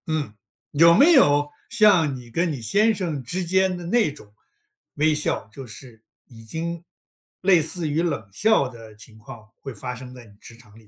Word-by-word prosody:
嗯， 155 -8 -3 0.4
有 165 +3 +6
没 300 - +6
有 145 - +4 0.2
像 195 - +3
你 125 -2 -11
跟 170 +6 0
你 135 -5 -6
先 210 - +2
生 170 -9 -4
之 180 +9 -4
间 190 +1 +1
的 175 - -8
那 220 -4 +2
种 105 -8 -16 0.6
微 155 +1 +2
笑， 150 -6 -2
就 135 +1 -9
是 115 +1 -11 0.2
已 115 -4 -15
经 165 +8 -5 0.6
类 185 -3 +4
似 160 +2 -2
于 150 +2 0
冷 160 - -3
笑 215 - +2
的 115 -3 -13
情 110 +1 -14
况 110 -1 -13
会 135 - -8
发 125 +3 -6
生 125 0 -11
在 125 -2 -13
你 105 - -19
职 115 - -14
场 110 -3 -19
里 110 -1 -19
145 Hz, 205 characters per minute, -23 LUFS, 120-175 Hz, 0.6 s, 有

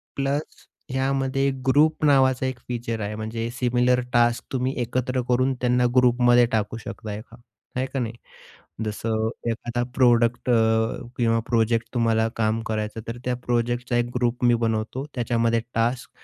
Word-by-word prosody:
Plus 140 +2 -3 0.2
ह्यामध्ये 135 +1 0 0.2
group 150 +4 +3
नावाचा 130 -2 +4
एक 130 -1 -3
फीचर 115 -2 -3
आहे. 105 +1 -3
म्हणजे 110 +1 -4
सिमिलर 125 0 +2
टास्क 120 0 +3
तुम्ही 130 0 0
एकत्र 125 +2 -1
करून 130 +2 +2
त्यांना 125 0 +2
ग्रुपमध्ये 120 -1 +5
टाकू 110 0 -1
शकता 110 -2 -7
एका, 110 +2 -9 0.4
आहे 130 +1 0
का 135 - -4
नाही. 115 -2 -2 0.7
जसं 110 +1 -1 0.2
एखादा 120 +1 -3
प्रॉडक्ट 120 -1 +3
अ, 110 -1 +2 0.2
किंवा 115 -1 +2
प्रोजेक्ट 115 -1 +1
तुम्हाला 115 -2 +2
काम 110 0 +1
करायचं, 110 0 -3
तर 115 +1 -4
त्या 125 0 0
प्रोजेक्टचा 120 0 0
एक 120 0 0
ग्रुप 125 +1 0
मी 120 -1 +5
बनवतो. 110 +5 -2
त्याच्यामध्ये 115 -1 +1
टास्क 120 +3 0
120 Hz, 145 wpm, -24 LUFS, 115-125 Hz, 0.7 s, ग्रुपमध्ये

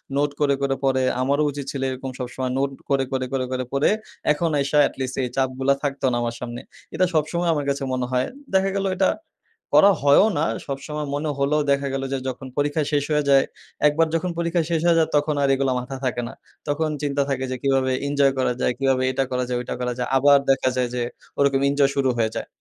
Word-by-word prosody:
Note 145 +1 +2
করে, 140 -1 +3
করে 135 -1 +1
পড়ে। 130 -1 +2 0.2
আমারও 140 +3 +2
উচিৎ 140 -1 -6
ছিল 135 - -5
এরকম 130 0 -5
সবসময় 130 +1 -3
নোট 135 0 0 0.2
করে, 135 -1 +2
করে, 130 -1 -1
করে, 130 -1 0
করে 130 -1 -2
পড়ে, 140 +2 +2 0.4
এখন 165 +2 0
আইসা 140 +2 +1
এটলিস্ট 130 -1 -5
এই 125 - -2
চাপগুলো 130 +1 +1
থাকতো 140 -1 -2
না - - 0
আমার 115 0 -2
সামনে। 120 -1 -5 0.3
এটা 185 - +2
সবসময় 165 +3 0
আমার 145 -2 -2
কাছে 140 0 -1
মনে 125 -1 -1
হয়। 125 0 +1 0.3
দেখা 190 0 +3
গেলো 195 0 0
এটা 190 0 +3 0.7
করা 200 - +8
হয়ও 145 +8 +6
না, 155 - +2 0.2
সবসময় 150 +2 -4
মনে 150 +2 -2
হলেও 140 +2 +2
দেখা 140 0 +1
গেলো 135 0 -2
যে, 135 - 0
যখন 130 +1 -6
পরীক্ষা 145 +2 +1
শেষ 145 -1 +2
হয়ে 150 -1 +2
যায় 135 -1 +6 0.4
একবার 160 +2 +2
যখন 175 +2 0
পরীক্ষা 170 0 +1
শেষ 165 -2 +1
হয়ে 170 -1 +5
যায়, 160 - +3
তখন 145 +1 +1
আর 140 - +3
এগুলো 135 -1 0
মাথায় 130 +1 -7
থাকে 120 -1 -1
না। - - -9 0.4
তখন 155 +2 0
চিন্তা 145 -1 0
থাকে 130 -1 -1
যে 130 - -2
কীভাবে 135 -1 +2 0.2
এঞ্জয় 140 -1 +3
করা 125 -1 +2
যায়? - - +2
কীভাবে 135 -1 +2
এটা 135 +1 0
করা 125 0 0
যায়? 125 -1 -1
ওইটা 125 - -4
করা 125 0 -1
যায়? 125 - -2
আবার 140 +1 +6
দেখা 135 -1 +3
যায় 125 -1 +1
যে, 125 - -1 0.4
ওরকম 140 -1 +3
এঞ্জয় 140 -1 +3
শুরু 135 -1 +2
হয়ে 110 -1 +1
যায়। - - -3
140 Hz, 220 wpm, -23 LUFS, 130-145 Hz, 0.7 s, করা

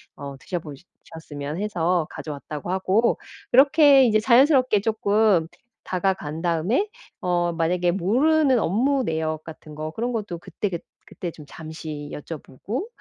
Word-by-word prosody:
어 140 -1 -7
드셔보시 160 -2 -6 0.2
셨으면 150 -2 -7
해서 175 -5 0
가져왔다고 150 +2 -6
하고 190 +5 +2 0.3
그렇게 280 0 +7
이제 215 -2 +3
자연스럽게 255 -1 +4
쪼끔 210 -4 +2 0.4
다가간 180 -5 -2
다음에 180 - +1 0.3
어 175 -1 +1
만약에 175 +2 +1
모르는 260 - +3
업무 255 +9 +1
내역 160 -3 -2
같은 155 -1 -11
거 155 +1 -5
그런 235 +8 -2
것도 205 -7 -4
그때 205 +4 -4
그 170 -3 -4 0.3
그때 175 - -6
좀 150 -2 -13
잠시 155 -2 -8
여쭤보고. 165 - -6
180 Hz, 300 characters per minute, -24 LUFS, 160-230 Hz, 0.4 s, 그렇게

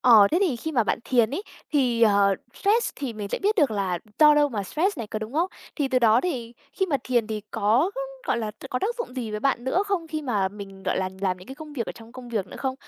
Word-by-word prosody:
Ờ, 220 -5 +8
thế 335 - +3
thì 335 -11 +2
khi 315 +7 -4
mà 240 -6 +3
bạn - - 0
thiền 235 -3 +3
ấy 320 +9 -3 0.3
thì, 250 -5 +2
ờ, 200 -2 +5 0.2
stress 435 +4 +2
thì 265 -5 -4
mình 210 -2 -5
sẽ - - -2
biết 415 +2 +2
được 290 - +4
là 195 -4 -1 0.2
do 300 -1 +8
đâu 295 -1 +4
mà 210 -6 -3
stress 320 - -1
này, 225 - -4
có 215 - -4
đúng 215 +2 -6
không? 335 +5 +1 0.3
Thì 285 -3 0
từ 255 -1 +3
đó 225 -2 +5
thì 245 -10 -3 0.2
khi 380 +5 0
mà 295 - +1
thiền 240 -3 +1
thì 215 -1 -3
có, 230 - +2 0.4
gọi 235 - +1
là, 220 -2 -2 0.2
có 250 - 0
tác 440 - -1
dụng 460 - -5
gì 235 -4 -3
với 210 - -3
bạn 255 -1 +1
nữa 305 +9 +2
không 370 -5 -1
khi 310 -1 -3
mà 210 -8 +1
mình, 195 -1 -10
gọi - - 0
là, 185 - 0
làm 185 -2 0
những 185 - -14
cái 265 - -7
công 305 0 -10
việc 240 -6 -3
ở - - -4
trong 230 0 -14
công 255 -1 -10
việc 215 -5 -2
nữa - - -10
không, 265 -1 -2
245 Hz, 280 wpm, -25 LUFS, 215-300 Hz, 0.4 s, Ờ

